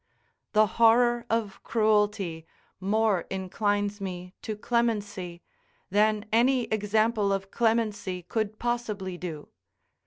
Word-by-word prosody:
The 215 0 +6 0.2
horror 240 +1 +5
of 220 -3 -1
cruelty 210 -7 +1 0.3
more 200 -1 +1
inclines 205 +2 -1
me 180 -1 -6
to 215 - -4
clemency, 205 -7 -1 0.5
than 215 +1 +2
any 250 +2 +4
example 215 0 +1
of 195 0 -2
clemency 215 -5 0
could 215 +3 -2
possibly 210 -7 -3
do. 160 -5 -6
210 Hz, 100 wpm, -27 LUFS, 190-225 Hz, 0.5 s, The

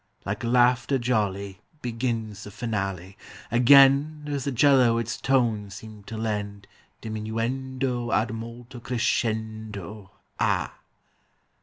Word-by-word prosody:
Like 100 +1 -3
laughter 125 +2 +3
jolly 100 -6 -1 0.2
Begins 115 -4 -3
the - - -8
finale; 100 -4 -4 0.3
Again 140 +5 +6
does 145 -3 -3
the 140 - -1
'cello 130 -2 +4
its 115 -1 -2
tones 110 -7 0
seem 110 -1 -11
to 110 - -7
lend 105 -2 -3 0.4
Diminuendo 120 +3 -3
ad 110 +1 +1
molto 115 +2 -8
crescendo. 110 -5 -3 0.3
Ah! - - +1
115 Hz, 105 wpm, -25 LUFS, 105-125 Hz, 0.4 s, Again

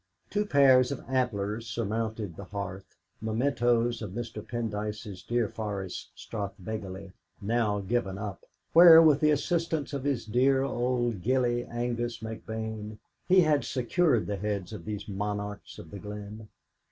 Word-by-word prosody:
Two 210 0 0
pairs 130 -5 +5
of 140 - -5
antlers 115 -4 -1
surmounted 110 -3 -3
the 100 - -8
hearth, 95 -1 -6 0.3
mementoes 120 0 +1
of 100 -4 -5
Mr. 115 -1 -5
Pendyce's 105 -3 -4
deer 120 -2 0
forest, 100 -4 -5
Strathbegally, 100 -2 -6 0.3
now 105 -1 0
given 100 -1 -1
up, 100 -1 -6 0.3
where, 165 -1 +10
with 155 -3 +6
the 150 - +4
assistance 160 0 0
of 140 -2 -3
his 140 -5 -1
dear 130 +4 +3
old 120 -5 0
gillie 120 +1 +1
Angus 120 0 -2
McBane, 110 -1 -6 0.3
he 185 0 +6
had 150 -3 +3
secured 130 0 +1
the 100 - -3
heads 100 -1 -3
of 105 - -8
these 105 -1 -5
monarchs 105 0 -4
of 80 - -11
the 100 - -7
glen. 105 +2 -8
110 Hz, 140 wpm, -29 LUFS, 105-125 Hz, 0.3 s, where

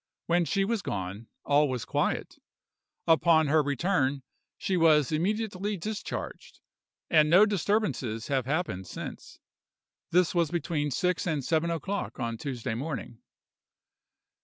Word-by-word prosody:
When 175 0 +2
she 195 +3 +1
was 225 0 -1
gone, 100 - -5 0.2
all 145 0 +3
was 125 -3 -3
quiet. - - -1 0.7
Upon 165 -1 +4
her 155 +1 +5
return 145 -1 0 0.3
she 190 - -1
was 155 -5 +4
immediately 205 +4 -1
discharged, 210 +5 -6 0.5
and 155 -2 +4
no 185 +6 +7
disturbances 160 - -1
have 135 -3 -1
happened 140 - -2
since. - - -8 0.7
This 180 0 +3
was 170 -3 +2
between 155 -3 -1
six 180 +7 0
and 150 -6 -1
seven 165 +1 +1
o'clock 190 +2 -3
on 115 -2 -2
Tuesday 125 -5 -4
morning. 120 -3 -5
160 Hz, 125 wpm, -28 LUFS, 135-180 Hz, 0.7 s, no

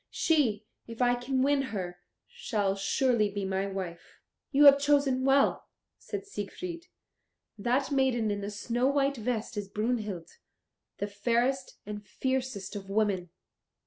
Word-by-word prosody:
She, 240 -10 +1 0.2
if 230 -1 -9
I 245 -1 +4
can 255 +2 0
win 280 0 +3
her, 185 -9 -4 0.3
shall 220 - -1
surely 215 +2 +2
be 200 -1 -3
my 190 +1 -1
wife." 185 -3 -6 0.3
"You 290 +1 +5
have 280 0 +9
chosen 280 -2 +2
well," 275 +1 +3 0.3
said 410 -2 -6
Siegfried; 340 - -6 0.7
"that 255 +6 +1
maiden 255 -5 +2
in 205 0 -2
the 200 - -4
snow 235 +5 -1
white 280 0 +1
vest 225 -1 -3
is 205 -1 -3
Brunhild, 210 -5 -3 0.6
the - - -1
fairest 235 +6 0
and 210 0 -6
fiercest 255 -2 -3
of 195 -1 -7
women." 195 -4 0
235 Hz, 140 wpm, -29 LUFS, 205-270 Hz, 0.7 s, have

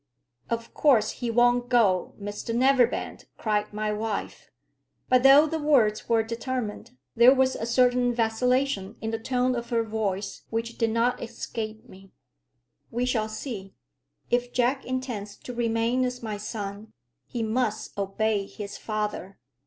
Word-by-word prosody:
"Of 230 0 -3
course 235 -8 +4
he 240 - -4
won't 245 +1 +3
go, 210 -7 +2
Mr 205 +3 -4
Neverbend," 255 -1 +2
cried 210 -1 -1
my 210 0 -2
wife. 215 0 -4 0.6
But, 255 0 +5
though 275 +3 +8
the 320 +1 -2
words 250 -9 +2
were 225 -1 +3
determined, 235 +1 -4 0.2
there 240 +3 +7
was 260 0 +2
a 225 - -4
certain 245 0 +3
vacillation 235 -1 0
in 220 +1 -3
the 225 - -2
tone 250 +2 0
of 235 -1 -4
her 230 -2 +1
voice 205 -3 -3
which 230 +1 -3
did 230 -1 +2
not 230 +2 +1
escape 225 -2 -6
me. 195 +1 -15 0.8
"We 245 +2 -1
shall 220 -4 0
see. 215 -4 -6 0.6
If 245 0 +1
Jack 250 +3 +1
intends 245 -6 -4
to 250 - -8
remain 235 +1 +1
as 250 -1 -3
my 215 -2 -3
son, 205 0 -6 0.3
he 235 -2 -3
must 220 -1 -1
obey 200 +1 -1
his 205 -1 -8
father. 210 -3 -4
230 Hz, 145 wpm, -26 LUFS, 215-250 Hz, 0.8 s, though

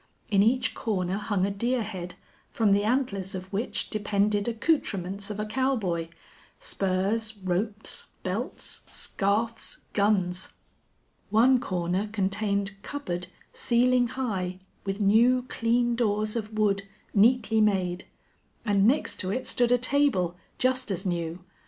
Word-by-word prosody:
In 200 -1 +5
each 245 +5 +2
corner 190 -4 -1
hung 205 -3 0
a 200 - -1
deer 235 +4 0
head, 185 -4 -6 0.3
from 220 -3 +2
the 200 +1 +4
antlers 210 -6 0
of 185 +1 -7
which 210 +5 -2
depended 205 0 +1
accoutrements 200 - 0
of 210 0 -5
a 210 - -1
cowboy 215 -9 0 0.5
spurs, 215 - 0
ropes, 200 +3 -2 0.2
belts, - - -3
scarfs, 220 +4 -1
guns. 190 -3 +1 0.8
One 250 +4 +5
corner 180 +1 -1
contained 200 -1 -1
cupboard, 180 -12 -4 0.3
ceiling 245 +1 +3
high, 195 -8 -3 0.3
with 195 +1 -2
new, 235 +5 +4
clean 240 +1 +1
doors 215 -2 0
of 215 -1 -4
wood, 200 -2 +2 0.3
neatly 220 +1 +4
made; 190 -3 +1 0.6
and 205 -1 +4
next 290 +5 +1
to 185 - -2
it 255 +6 -2
stood 245 -1 +2
a 245 - +6
table, 245 -9 +2 0.2
just 255 -1 +1
as 190 0 -3
new. 170 -1 -2
210 Hz, 125 wpm, -27 LUFS, 190-235 Hz, 0.8 s, a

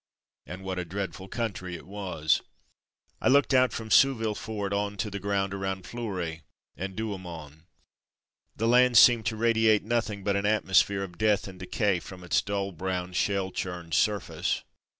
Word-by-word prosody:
And 95 +2 -8
what 95 -1 -3
a - - -2
dreadful 95 +1 -5
country 95 -5 -4
it - - -10
was! 90 -6 0 0.8
I - - +1
looked 140 +1 +4
out 130 -1 +5
from 110 -1 -6
Souville 115 -6 +4
fort 105 -2 -4
on 100 0 -1
to 105 - -2
the 100 - -4
ground 100 0 -1
around 95 -1 -3
Fleury 95 -9 -4 0.3
and 95 +1 -5
Douaumont. 90 -8 -6 0.9
The 115 - 0
land 125 0 +5
seemed 115 -4 +7
to 110 - -1
radiate 110 -1 +3
nothing 110 -3 -1
but 100 0 +1
an 100 +1 0
atmosphere 100 -2 +3
of 90 -3 -9
death 105 -2 +2
and 95 -1 -10
decay 95 +1 0
from 90 +1 -11
its 90 - +2
dull 100 -1 -2
brown, 90 +1 -3
shell 95 +1 0
churned 90 -3 -5
surface. 105 -5 0
100 Hz, 165 wpm, -28 LUFS, 90-110 Hz, 0.9 s, seemed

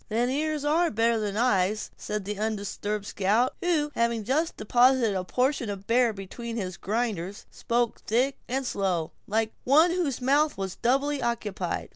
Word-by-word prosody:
"Then 235 +3 +1
ears 300 +1 -1
are 330 +3 +3
better 230 +1 +2
than 205 -1 -2
eyes," 210 -3 +1
said 210 -2 -4
the 205 0 -4
undisturbed 210 -1 -2
scout, 210 +5 +1
who, 315 -4 +1
having 235 -1 0
just 305 +9 0
deposited 245 0 +3
a 185 -1 -1
portion 250 +3 0
of 200 -1 -4
a - - -22
bear 235 +2 +3
between 225 +4 -7
his 185 -4 -3
grinders, 205 -2 -3
spoke 235 -1 -1
thick 255 +5 +1
and 265 +2 -2
slow, 185 -8 -1 0.2
like 220 +1 0
one 310 +7 +5
whose 345 -7 -1
mouth 285 +4 +2
was 190 -1 -4
doubly 275 +4 +1
occupied. 210 -6 -2
230 Hz, 165 wpm, -27 LUFS, 205-265 Hz, 0.2 s, one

